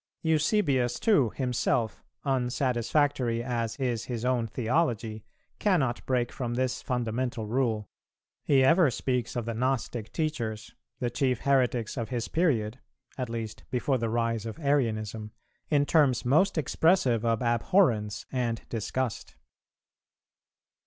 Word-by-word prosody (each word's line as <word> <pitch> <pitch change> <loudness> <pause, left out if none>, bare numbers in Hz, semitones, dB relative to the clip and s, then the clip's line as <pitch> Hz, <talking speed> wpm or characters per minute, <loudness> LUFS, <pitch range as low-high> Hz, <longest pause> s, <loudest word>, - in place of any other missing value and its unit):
Eusebius 150 - +2
too 170 - +3
himself, 125 -3 0 0.2
unsatisfactory 125 -1 +1
as 115 -2 -2
is 120 -4 -2
his 120 -1 -4
own 125 -2 +1
theology, 115 -3 -1 0.4
cannot 150 - +1
break 125 -2 +1
from 120 -2 -3
this 130 0 -1
fundamental 120 -2 -2
rule; 110 -2 0 0.6
he 135 -2 +4
ever 165 +2 +5
speaks 125 0 -2
of 120 -2 -2
the 115 - -2
Gnostic 120 -2 -2
teachers, 120 -9 -3 0.3
the 120 -1 -1
chief 130 -1 0
heretics 130 -4 +1
of 115 -3 -3
his 120 -2 -2
period 125 -9 +1 0.4
(at 125 -3 -4
least 115 -2 -5
before 130 +1 0
the 115 -1 -1
rise 115 -1 -1
of 110 - -6
Arianism), 110 -8 -1 0.4
in 145 -2 +3
terms 140 -6 +3
most 165 +10 +3
expressive 155 - +2
of 115 0 +1
abhorrence 120 - +2
and 120 -3 -1
disgust. 120 +1 -3
125 Hz, 125 wpm, -28 LUFS, 115-135 Hz, 0.6 s, ever